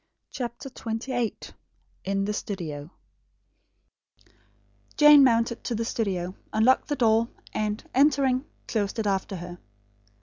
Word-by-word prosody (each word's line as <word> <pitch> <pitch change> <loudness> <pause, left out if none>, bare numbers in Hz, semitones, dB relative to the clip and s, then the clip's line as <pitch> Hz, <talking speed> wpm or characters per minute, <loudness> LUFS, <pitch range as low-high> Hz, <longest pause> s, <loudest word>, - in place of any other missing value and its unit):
CHAPTER 245 +2 -5
XXVIII 235 -1 -3 0.7
IN 195 +1 0
THE 210 - -1
STUDIO 165 -9 -5 2.1
Jane 295 -1 +8
mounted 235 -2 +2
to 235 - -1
the 230 +1 -2
studio; 185 -6 -2 0.2
unlocked 225 +4 +3
the 290 - -1
door, 230 -3 +3 0.3
and, 210 0 -2
entering, 270 -2 +3 0.2
closed 205 -2 -2
it 220 - -1
after 195 -1 -1
her. 175 0 -8
225 Hz, 110 wpm, -26 LUFS, 195-255 Hz, 2.1 s, Jane